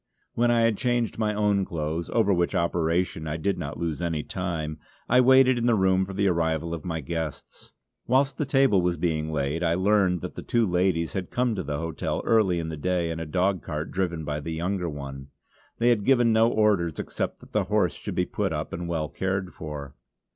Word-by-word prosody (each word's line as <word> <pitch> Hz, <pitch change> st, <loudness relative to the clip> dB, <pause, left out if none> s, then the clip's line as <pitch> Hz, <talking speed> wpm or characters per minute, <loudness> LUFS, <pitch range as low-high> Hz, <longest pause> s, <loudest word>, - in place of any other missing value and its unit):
When 120 Hz, +1 st, +2 dB
I 120 Hz, -1 st, +3 dB
had 115 Hz, -2 st, +2 dB
changed 120 Hz, -3 st, 0 dB
my 110 Hz, -1 st, +1 dB
own 105 Hz, -2 st, +2 dB
clothes, 80 Hz, -1 st, -3 dB
over 105 Hz, -4 st, +2 dB
which 85 Hz, -1 st, 0 dB
operation 85 Hz, -1 st, 0 dB
I 75 Hz, +1 st, -2 dB
did 95 Hz, +3 st, -1 dB
not 75 Hz, -3 st, -5 dB
lose 85 Hz, -1 st, -3 dB
any 80 Hz, -3 st, -1 dB
time, 80 Hz, -4 st, -4 dB, 0.3 s
I 125 Hz, +2 st, +5 dB
waited 130 Hz, -1 st, +5 dB
in 120 Hz, -, 0 dB
the 120 Hz, -, +4 dB
room 95 Hz, -1 st, +3 dB
for 95 Hz, -, -7 dB
the 100 Hz, +1 st, +1 dB
arrival 85 Hz, -2 st, 0 dB
of 85 Hz, -, -5 dB
my 80 Hz, -2 st, -3 dB
guests. 80 Hz, +1 st, -6 dB, 0.4 s
Whilst 135 Hz, +2 st, +2 dB
the 150 Hz, -, 0 dB
table 135 Hz, -8 st, +4 dB
was 90 Hz, -1 st, 0 dB
being 80 Hz, -2 st, -1 dB
laid 75 Hz, +2 st, -1 dB
I 85 Hz, -1 st, +2 dB
learned 95 Hz, -2 st, +2 dB
that -, -, -6 dB
the -, -, -7 dB
two 120 Hz, -1 st, +1 dB
ladies 90 Hz, -3 st, +1 dB
had 95 Hz, -2 st, -3 dB
come 125 Hz, -1 st, 0 dB
to 100 Hz, -, -2 dB
the 75 Hz, -3 st, -3 dB
hotel 80 Hz, 0 st, -3 dB
early 105 Hz, -6 st, +3 dB
in 80 Hz, -1 st, -3 dB
the 80 Hz, -, -5 dB
day 85 Hz, +1 st, 0 dB
in 80 Hz, -, -4 dB
a 80 Hz, -, -5 dB
dogcart 90 Hz, -2 st, -1 dB
driven 85 Hz, -4 st, -2 dB
by 75 Hz, 0 st, -2 dB
the 80 Hz, +2 st, -5 dB
younger 90 Hz, +2 st, -2 dB
one. 70 Hz, -2 st, -7 dB, 0.5 s
They 120 Hz, +1 st, +3 dB
had 115 Hz, -4 st, +2 dB
given 120 Hz, -2 st, +4 dB
no 110 Hz, +1 st, +5 dB
orders 100 Hz, -8 st, +2 dB
except -, -, -3 dB
that -, -, -16 dB
the -, -, +1 dB
horse -, -, +1 dB
should -, -, -6 dB
be -, -, +1 dB
put -, -, -2 dB
up -, -, -4 dB
and 85 Hz, 0 st, -4 dB
well 80 Hz, -2 st, -1 dB
cared 95 Hz, +2 st, -3 dB
for. 75 Hz, -3 st, -7 dB
90 Hz, 215 wpm, -26 LUFS, 80-105 Hz, 0.5 s, I